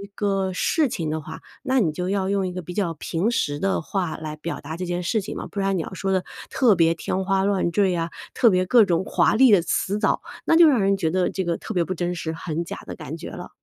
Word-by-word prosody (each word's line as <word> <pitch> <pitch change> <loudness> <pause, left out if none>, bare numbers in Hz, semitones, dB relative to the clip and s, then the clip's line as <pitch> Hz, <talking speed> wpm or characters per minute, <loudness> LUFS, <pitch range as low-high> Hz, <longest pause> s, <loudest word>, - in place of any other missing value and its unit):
个 195 -2 0
事 300 - +1
情 160 -6 -3
的 155 - -2
话， 160 +2 -9 0.2
那 265 -1 +2
你 165 - +1
就 180 +4 -3
要 195 -1 0
用 195 -1 0
一 180 - -5
个 180 - -4
比 175 +1 -8
较 185 -5 -1
平 165 +6 -1
实 145 -10 -1
的 195 -3 0
话 175 +2 -2
来 155 -1 -6
表 170 +3 -5
达 155 +3 -6
这 180 - -4
件 175 0 -2
事 220 +6 +1
情 200 - -6
嘛， - - -5
不 205 - -6
然 195 -1 +1
你 170 - 0
要 - - -7
说 195 +1 -2
得 185 -1 +1 0.3
特 240 -6 +4
别 165 -1 +4
天 190 +3 -2
花 195 0 +1
乱 195 -3 +1
坠 200 -2 +3
呀， 170 -1 -1 0.2
特 235 - +5
别 185 -2 +2
各 230 +2 +6
种 175 -1 +1
华 - - +2
丽 255 0 +6
的 195 - +6
辞 195 +4 -1
藻， - - +1 0.2
那 - - +4
就 330 -1 +8
让 260 -6 +3
人 195 0 +3
觉 165 -5 0
得 185 +1 +1
这 190 - -2
个 170 -2 -1
特 - - -7
别 175 - +2
不 185 - -3
真 175 0 -2
实， 160 -1 -3
很 165 0 -3
假 - - -7
的 - - -7
感 - - -7
觉 - - -8
了。 - - -8
185 Hz, 295 characters per minute, -23 LUFS, 170-200 Hz, 0.3 s, 就